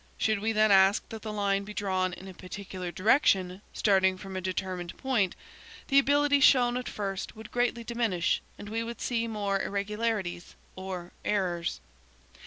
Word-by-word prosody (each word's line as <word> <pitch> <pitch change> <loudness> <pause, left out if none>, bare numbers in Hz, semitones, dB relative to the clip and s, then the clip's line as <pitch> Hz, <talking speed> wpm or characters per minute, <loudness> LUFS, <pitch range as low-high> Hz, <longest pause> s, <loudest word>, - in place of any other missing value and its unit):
Should 220 -2 +1
we 220 +2 0
then 215 -1 +4
ask 195 +1 +5
that 220 -1 -7
the 215 - -5
line 200 -1 0
be 210 +1 -9
drawn 185 -2 0
in 190 - -9
a 190 - -8
particular 185 -1 -7
direction, 190 -3 +2
starting 190 -2 +3
from 190 +1 -8
a 185 - -2
determined 185 -1 -4
point, 235 -8 0 0.5
the 275 -1 +6
ability 285 +1 +3
shown 245 -2 +5
at 250 0 -3
first 195 -2 -4
would 220 +1 -11
greatly 240 -1 0
diminish, 225 -7 0 0.2
and 205 - -9
we 225 +1 -2
would 235 +1 -6
see 240 -2 -1
many 225 - -5
more 200 -2 0
irregularities, 200 -3 -2 0.2
or 185 -2 -6
errors. 180 -5 -1
200 Hz, 170 wpm, -29 LUFS, 185-225 Hz, 0.5 s, the